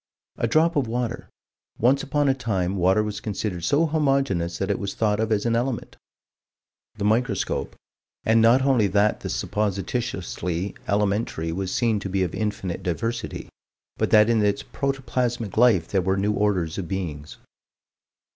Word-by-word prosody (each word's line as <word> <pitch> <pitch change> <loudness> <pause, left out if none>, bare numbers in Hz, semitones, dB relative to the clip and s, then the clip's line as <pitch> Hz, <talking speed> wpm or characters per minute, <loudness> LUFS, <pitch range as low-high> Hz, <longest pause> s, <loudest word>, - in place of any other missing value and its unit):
A - - 0
drop 165 +2 +3
of 140 -5 +1
water. 120 0 -3 0.5
Once 130 +4 +3
upon 145 0 0
a 135 - +4
time 100 -8 -1
water 95 +3 +3
was 105 -1 -4
considered 100 -4 -4
so 145 - +3
homogeneous 135 - 0
that 95 +1 -1
it 100 - -1
was 100 0 -4
thought 105 -2 +1
of 110 0 0
as 105 0 +1
an 115 -1 +2
element. 120 +1 -2 1.0
The 105 - -5
microscope 110 -1 0 0.5
and 115 +1 +4
not 120 +4 +5
only 130 -6 +3
that 100 +2 +2
the - - -5
supposititiously 95 - -2
elementary 100 -5 0
was 95 +2 -3
seen 115 -3 +1
to 100 - -5
be 95 0 +1
of 90 - -3
infinite 100 -4 -3
diversity, 115 +7 -3 0.5
but - - 0
that 105 0 +6
in 115 -2 +2
its 100 0 +1
protoplasmic 125 -5 -2
life 110 -8 +4
there 95 - +1
were 95 +2 0
new 105 +2 +1
orders 100 -5 0
of 90 - -4
beings. 80 -6 -5
105 Hz, 160 wpm, -24 LUFS, 95-120 Hz, 1.0 s, that